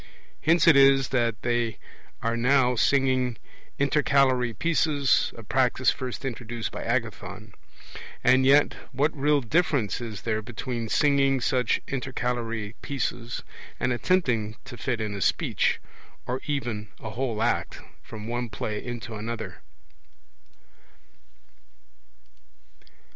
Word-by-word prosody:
Hence 165 0 +4
it 165 - +7
is 135 -1 +6
that 120 -4 0
they 120 -2 0 0.5
are 115 +1 +1
now 125 +1 +3
singing 130 -2 +2 0.4
intercalary 135 -3 +3
pieces, 150 0 +2
a 115 - -9
practice 130 +3 +2
first 130 0 -5
introduced 120 -2 -4
by - - -6
Agathon. - - -3 0.7
And 130 +1 +5
yet 140 +2 +5 0.2
what 145 +5 +1
real 145 0 +2
difference 135 - +1
is 110 -4 -6
there 110 -1 -1
between 115 0 -5
singing 140 -1 +3
such 125 0 +1
intercalary 120 -4 -3
pieces, 120 -3 -3 0.4
and 125 - +1
attempting 120 - +1
to 135 -2 -8
fit 120 -1 -2
in 105 -1 -3
a 100 - -5
speech, - - +1 0.5
or 125 +2 -3
even 120 -8 -2
a 110 - -6
whole 115 -2 -2
act, 120 - -1 0.2
from 110 -1 -9
one 120 0 -2
play 105 0 -4
into 120 -2 -6
another? 110 +1 -5
125 Hz, 115 wpm, -26 LUFS, 115-135 Hz, 0.7 s, it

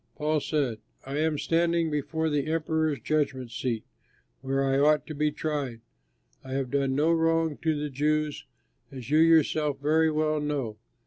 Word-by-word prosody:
Paul 155 0 0
said, 135 -7 -1 0.3
"I 140 +2 -3
am 155 -1 +1
standing 170 +1 +1
before 155 +2 -1
the 145 0 0
Emperor's 160 -2 0
judgment 130 -3 -1
seat, 115 -2 -2 0.6
where 135 +1 0
I 135 0 +2
ought 150 +1 +3
to 155 - -7
be 150 +1 0
tried. 145 -6 -3 0.6
I 130 - -7
have 135 -2 -2
done 135 -1 +1
no 155 +4 +3
wrong 165 -1 +2
to 160 -2 0
the 150 -1 -3
Jews, 150 +2 -1 0.5
as 130 -1 -8
you 155 - +5
yourself 155 -3 +3
very 160 +3 +3
well 155 0 0
know. 140 -7 -3
150 Hz, 165 wpm, -27 LUFS, 135-155 Hz, 0.6 s, you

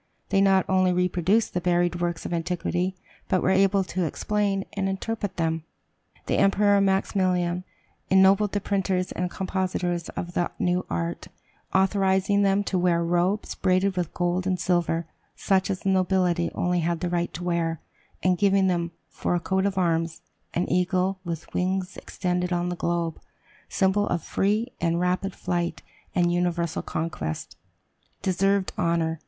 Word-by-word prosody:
They 195 -1 +3
not 195 -1 +4
only 185 -1 +3
reproduced 180 +4 +1
the 180 - -1
buried 175 0 +1
works 175 -1 -2
of - - -3
antiquity, 180 +2 -1 0.3
but 185 - +2
were 190 - +3
able 195 +1 +3
to 185 0 -2
explain 200 +3 -1
and 195 -1 -1
interpret 205 +1 -3
them. 165 -1 0 0.6
The - - 0
Emperor 200 0 +4
Maximilian 185 -2 +1 0.4
ennobled 190 +2 +5
the 205 - 0
printers 190 -2 0
and 180 0 -2
compositors 185 -2 -2
of 175 -1 -5
the 175 - 0
new 180 +1 0
art, 85 0 -3 0.4
authorizing 190 +1 +2
them 200 0 +3
to 190 -2 -1
wear 175 -1 +2
robes 175 +4 0
braided 185 +1 +1
with 180 -3 -2
gold 180 +1 0
and 185 -1 0
silver, 170 -2 +1 0.3
such 190 -1 +1
as 190 -2 -2
the 195 - 0
nobility 185 -2 +2
only 180 0 +1
had 170 0 -1
the 180 - -1
right 175 0 -1
to 175 - -5
wear, 170 -2 0 0.4
and 180 -1 +2
giving 195 -1 +4
them, 170 -2 0
for - - -2
a - - +1
coat 190 +3 0
of 195 -1 -3
arms, 165 -2 0 0.3
an 175 - 0
eagle 185 +1 +1
with 170 -2 -6
wings 185 +1 -1
extended 180 0 -2
on 175 0 0
the 175 - -2
globe, 170 -1 -1 0.5
symbol 200 +1 +2
of 175 - -1
free 215 +5 0
and 170 0 +1
rapid 180 +2 0
flight 175 -2 -2 0.3
and 175 -1 +3
universal 175 -2 0
conquest. 115 - -4 0.7
Deserved 195 +1 +1
honor! 165 -2 +1
180 Hz, 155 wpm, -25 LUFS, 175-190 Hz, 0.7 s, ennobled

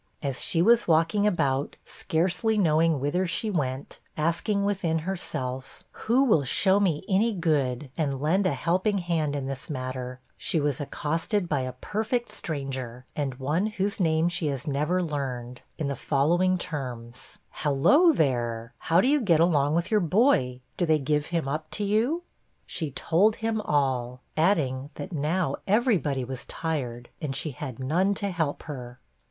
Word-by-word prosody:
As 135 -2 -2
she 165 0 +1
was 235 +3 +4
walking 165 +6 +3
about, 140 -8 0
scarcely 185 +7 0
knowing 165 -4 +3
whither 175 +7 0
she 210 +6 -1
went, 135 -6 -3 0.2
asking 170 +6 0
within 190 -5 0
herself, 135 -8 -4
'Who 245 +5 +2
will 210 - +4
show 190 +9 +3
me 185 -4 0
any 215 +4 +2
good, 145 -6 0
and 140 -5 -1
lend 180 +7 +2
a 170 - +1
helping 185 +9 +1
hand 165 -5 -1
in 140 -2 -3
this 135 +2 -6
matter,' 130 -2 -4 0.2
she 165 - 0
was 145 -1 0
accosted 165 +7 -1
by 150 -4 0
a 130 -1 -3
perfect 220 - -2
stranger, 130 -5 -5
and 140 -4 -2
one 150 +10 0
whose 205 0 -2
name 160 -2 +2
she 175 -2 -1
has 135 -3 -3
never 150 +6 0
learned, 125 -6 -4 0.2
in 155 - -2
the 140 - -2
following 170 +8 +2
terms: 125 -7 -6
'Halloo, 160 - +4
there; 120 - 0
how 170 +2 +3
do - - +2
you 290 +1 +3
get 170 -8 +3
along 155 -3 +3
with 170 +4 -1
your 215 - +4
boy? 165 - +2 0.2
do 175 - +1
they 155 -1 +4
give 150 +1 0
him 165 -4 -1
up 155 +3 -3
to 210 - -2
you?' 230 +12 +1 0.4
She 160 -4 -3
told 180 +10 +2
him 225 -1 -1
all, 130 -5 0
adding 145 -6 +1
that 185 - -7
now 155 0 0
every 220 0 +3
body 135 -4 -2
was 130 +1 -6
tired, 125 -7 -4
and 140 -3 -3
she 150 +2 -2
had 130 -2 -7
none 175 +10 +1
to 200 -1 -2
help 160 -5 -2
her. 125 -4 -8
155 Hz, 165 wpm, -27 LUFS, 135-185 Hz, 0.4 s, was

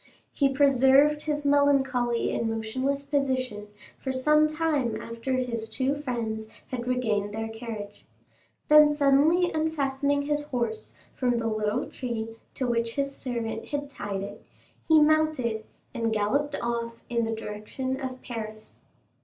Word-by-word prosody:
He 275 -2 +2
preserved 275 +2 +5
his 295 -1 -2
melancholy 270 -4 +2
and 230 - 0
motionless 260 +6 -2
position 260 -7 -1 0.3
for 265 - -3
some 300 +4 +4
time 305 -8 0
after 230 +3 -4
his 235 -3 -2
two 265 +1 0
friends 225 -5 -3 0.2
had 245 -1 -4
regained 215 -5 0
their 225 0 -3
carriage; 220 -3 -7 0.6
then 300 0 +7
suddenly 295 +5 +4
unfastening 285 -3 0
his 295 0 -1
horse 285 - -3 0.2
from 245 -2 +1
the 230 - -2
little 215 +1 0
tree 230 -3 -4 0.3
to 260 - -1
which 230 -1 0
his 275 0 -1
servant 230 -3 -4
had 285 -1 -4
tied 200 -6 -4
it, 205 +1 -8 0.4
he 320 -1 +7
mounted 300 -8 +2 0.3
and 230 -1 -1
galloped 275 +8 +1
off 235 -1 -3
in 235 -1 0
the 225 0 -1
direction 220 +5 -4
of 260 -2 -6
Paris. 215 -2 -7
255 Hz, 135 wpm, -27 LUFS, 225-285 Hz, 0.6 s, then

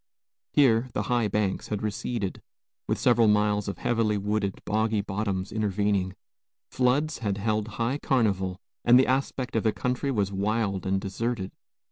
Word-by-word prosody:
Here, 130 -3 +4
the - - -1
high 120 -3 +1
banks 105 -2 -1
had 105 0 -3
receded, 105 -1 -3 0.5
with - - 0
several 120 -2 +4
miles 105 -1 +2
of 100 - -4
heavily 115 -3 +1
wooded, 100 -1 -1
boggy 110 0 +1
bottoms 95 -1 -3
intervening. 100 -3 0 0.6
Floods 140 +5 +1
had 100 -4 -1
held 105 +1 0
high 120 +5 0
carnival, 100 -10 +1 0.3
and 120 +1 +7
the 130 - +5
aspect 130 -1 -1
of 115 - +3
the 110 - +2
country 125 +5 -2
was 100 -7 0
wild 100 -1 -1
and 95 0 +1
deserted. 100 +1 -3
105 Hz, 150 wpm, -27 LUFS, 100-120 Hz, 0.6 s, and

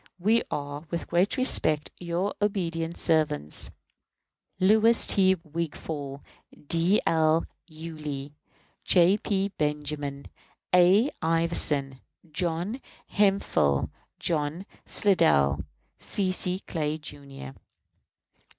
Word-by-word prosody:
We 215 +6 +3
are, 145 0 -5
with 170 - -3
great 175 +4 +1
respect, 155 - +2
your 175 +3 -2
obedient 170 -5 -1
servants, 150 - +2 0.9
LOUIS 220 +4 +4
T. 190 -1 +4
WIGFALL, 150 -3 -5 0.4
D. 170 +7 +2
L. 160 0 +2 0.2
YULEE, 155 -3 -7 0.5
J. 180 +2 +4
P. 200 -2 -1
BENJAMIN, 150 -2 -3 0.5
A. 190 +9 +5
IVERSON, 160 -5 0 0.3
JOHN 175 - -2 0.3
HEMPHILL, 195 - +2 0.3
JOHN 160 +3 -2 0.2
SLIDELL, 160 - +3 0.4
C. 190 -2 -1
C. 185 0 -2
CLAY, 155 -2 -2
Jr. 140 - -9
165 Hz, 85 wpm, -27 LUFS, 150-185 Hz, 0.9 s, A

